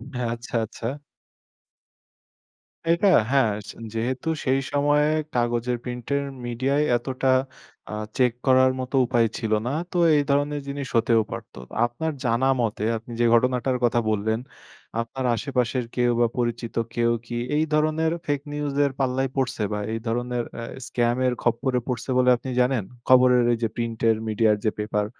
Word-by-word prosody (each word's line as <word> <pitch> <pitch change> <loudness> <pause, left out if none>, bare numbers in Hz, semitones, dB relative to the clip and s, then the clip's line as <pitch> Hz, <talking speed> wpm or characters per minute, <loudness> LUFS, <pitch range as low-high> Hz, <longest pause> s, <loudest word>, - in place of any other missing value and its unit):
হ্যাঁ। 125 -1 -1
আচ্ছা, 120 +1 -8
আচ্ছা। 115 +1 -7 2.0
এটা 170 +4 +3 0.2
হ্যাঁ 130 -6 +4 0.4
যেহেতু 125 +6 -2 0.2
সেই 135 0 +2
সময়ে 145 +1 +3 0.3
কাগজের 120 0 0
প্রিন্টের 125 +3 -2 0.2
মিডিয়ায় 130 +5 0
এতটা 130 +2 -1 0.6
অ্যা 105 - -5 0.2
চেক 125 -2 +4 0.2
করার 130 0 +5
মতো 130 +2 -3
উপায় 120 -2 +2
ছিল 110 -1 -3 0.2
না। - - 0 0.2
তো 180 - -2 0.2
এই 145 - +3
ধরনের 145 +1 +1
জিনিস 140 -1 -4
হতেও 115 0 +4
পারত। - - -7 0.3
আপনার 140 +7 -3
জানা 120 +3 +2
মতে 110 -2 -1
আপনি 115 +2 -12
যে 120 - +3
ঘটনাটার 125 +1 +2
কথা 120 0 +3
বললেন, 110 +1 0 0.6
আপনার 130 +3 -5
আশেপাশের 125 -2 -1
কেউ 120 -1 +2
বা 120 - +5
পরিচিত 120 -1 -2 0.2
কেউ 120 0 +2
কি 120 0 -4 0.2
এই 155 - +3
ধরনের 155 +1 +2
ফেক 145 -1 0
নিউজ 145 -1 -3
এর 140 - 0
পাল্লায় 130 0 0
পড়ছে 125 -5 -1
বা 105 - -1
এই 115 - -2
ধরনের 120 +1 -1 0.2
এ - - -5 0.2
স্কাম 120 0 +1
এর 125 - +1
খপ্পরে 125 +2 +1
পড়ছে 125 +1 -3
বলে 125 0 +4
আপনি 130 +2 -7
জানেন? 125 -3 +1 0.3
খবরের 125 -1 +6
এই 115 - 0
যে - - +3
প্রিন্ট 115 -1 -3 0.3
মিডিয়ার 110 0 +3
যে 110 - +3
পেপার 105 0 0
125 Hz, 155 wpm, -24 LUFS, 115-135 Hz, 2.0 s, খবরের